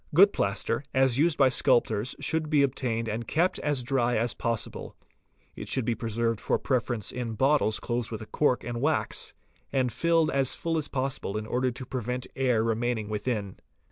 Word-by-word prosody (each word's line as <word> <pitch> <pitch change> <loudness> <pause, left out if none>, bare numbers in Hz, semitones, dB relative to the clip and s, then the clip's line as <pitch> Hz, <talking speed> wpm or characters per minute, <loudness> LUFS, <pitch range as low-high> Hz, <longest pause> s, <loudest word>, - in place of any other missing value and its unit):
Good 200 +4 +7
plaster, 110 +5 -1
as 130 -1 +3
used 165 0 +3
by 135 -2 +5
sculptors, 120 -2 +2
should 160 -1 0
be 150 -2 +4
obtained 120 -4 -1
and 110 +1 -3
kept 175 +4 +1
as 145 -4 0
dry 125 -2 +1
as 115 +1 0
possible. 115 -2 -3 0.6
It - - -7
should 130 -4 -1
be 120 - +1
preserved 115 -1 -1
for - - +1
preference 120 -5 -1
in 120 -2 -4
bottles 130 -3 +2
closed 120 -1 -2
with 110 -1 -5
a - - -9
cork 130 +1 +1
and 120 -1 -4
wax, 155 +3 -1 0.4
and 130 -2 +1
filled 165 +1 +2
as 135 -1 +1
full 165 -1 -1
as 150 - -4
possible 130 -6 -2
in 110 - -4
order 125 +3 0
to 125 +2 -6
prevent 125 0 -3
air 125 -4 +2
remaining 115 -1 -1
within. 105 -2 -3
125 Hz, 180 wpm, -27 LUFS, 115-135 Hz, 0.6 s, Good